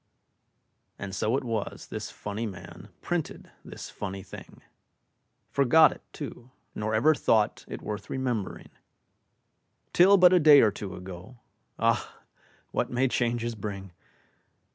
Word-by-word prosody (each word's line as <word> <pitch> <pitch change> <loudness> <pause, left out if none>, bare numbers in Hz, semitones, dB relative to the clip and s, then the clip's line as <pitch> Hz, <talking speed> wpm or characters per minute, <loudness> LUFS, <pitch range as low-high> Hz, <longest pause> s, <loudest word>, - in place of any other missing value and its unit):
And 95 -1 -6
so 110 +6 0
it - - -3
was 115 -4 -4
this - - -5
funny 105 +3 -5
man 90 +1 -10
Printed 175 -3 -4
this - - -9
funny 95 -1 -6
thing 95 - -12 0.9
Forgot 150 +3 +5
it, - - -11
too, 130 -4 -8 0.2
nor 110 +1 -2
ever 150 +9 +5
thought 110 -7 +1
It - - -7
worth 105 -1 -6
remembering, 125 -7 -3 1.2
Till 195 +3 +7
but 180 -1 +7
a 180 - +6
day 150 -3 +8
or 110 - +4
two 100 -1 -7
ago. 90 +6 -10 0.4
(Ah! - - 0 0.5
what - - -1
may 125 +2 +1
changes 120 -1 -1
bring!) 100 -3 -6
115 Hz, 130 wpm, -27 LUFS, 100-135 Hz, 1.2 s, day